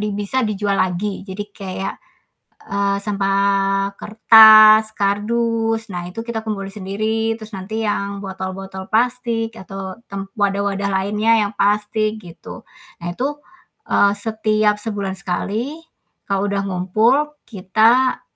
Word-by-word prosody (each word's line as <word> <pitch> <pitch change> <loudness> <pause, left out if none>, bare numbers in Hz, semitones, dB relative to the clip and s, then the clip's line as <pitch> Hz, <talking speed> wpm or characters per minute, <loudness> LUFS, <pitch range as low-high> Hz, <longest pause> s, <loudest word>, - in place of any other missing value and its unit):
bisa 210 +6 0
dijual 205 -2 -1
lagi. 190 +2 -2
Jadi 195 +2 -5
kayak, 190 -1 -5 0.7
eee, 200 0 0
sampah 195 -1 0
kertas, 220 0 +7
kardus, 225 +2 -1
nah 175 -1 -4
itu 185 - -7
kita 225 -1 -5
kumpulin 195 -3 -5
sendiri, 215 +3 -2
terus 215 0 -10
nanti 215 +4 -5
yang 200 -1 -2
botol-botol 190 0 -7
plastik 230 -1 0
atau 190 -1 -8
tem 195 0 -7
wadah-wadah 200 -1 0
lainnya 210 +3 +1 0.2
yang - - -11
plastik, 215 +2 0
gitu. 175 -4 -11 0.4
Nah 175 - -5
itu, 290 +3 -3 0.5
eee, 200 0 +3
setiap 215 0 0
sebulan 205 -3 -2
sekali, 210 - -3 0.5
kalau 195 0 0
udah 200 0 -1
ngumpul, 195 +6 +2 0.3
kita, 225 +5 +2
205 Hz, 120 wpm, -19 LUFS, 195-220 Hz, 0.7 s, kertas